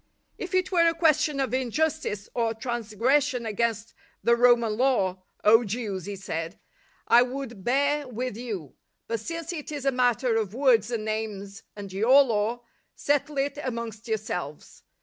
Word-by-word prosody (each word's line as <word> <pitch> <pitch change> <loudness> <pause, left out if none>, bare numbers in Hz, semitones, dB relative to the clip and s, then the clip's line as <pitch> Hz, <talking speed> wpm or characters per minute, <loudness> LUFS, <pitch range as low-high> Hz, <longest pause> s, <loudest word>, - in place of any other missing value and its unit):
" - - -47
If 370 0 -4
it 370 0 +1
were 340 -2 +4
a 330 - +2
question 305 -3 +2
of 260 -3 -1
injustice 260 -4 -1
or 230 -1 0
trans 230 -2 -5
gression 255 +1 +2
against 225 0 -1 0.3
the 235 - +4
(Roman) 235 -2 +4
law, 205 -7 +1 0.2
0 225 +3 +7
Jews," 200 -4 -4
he 205 - -4
said, 165 -3 -5 0.2
" - - -36
I - - +8
would 250 -5 -4
bear 285 +4 +1
with 250 -1 -4
you; 210 - -6 0.3
but 230 0 -2
since 330 - -5
it 305 -3 -6
is 290 -2 -5
a 275 - +3
matter 245 -2 +2
of 215 -1 -2
words 240 -5 +3
and 230 -3 -3
names 215 -2 -4
and 200 -2 -8
your 250 +8 +6
Law, 230 0 -1 0.3
settle 290 0 0
it 280 +2 -1
amongst 230 -3 -5
yourselves. 190 -9 -5
235 Hz, 170 wpm, -26 LUFS, 215-275 Hz, 0.3 s, I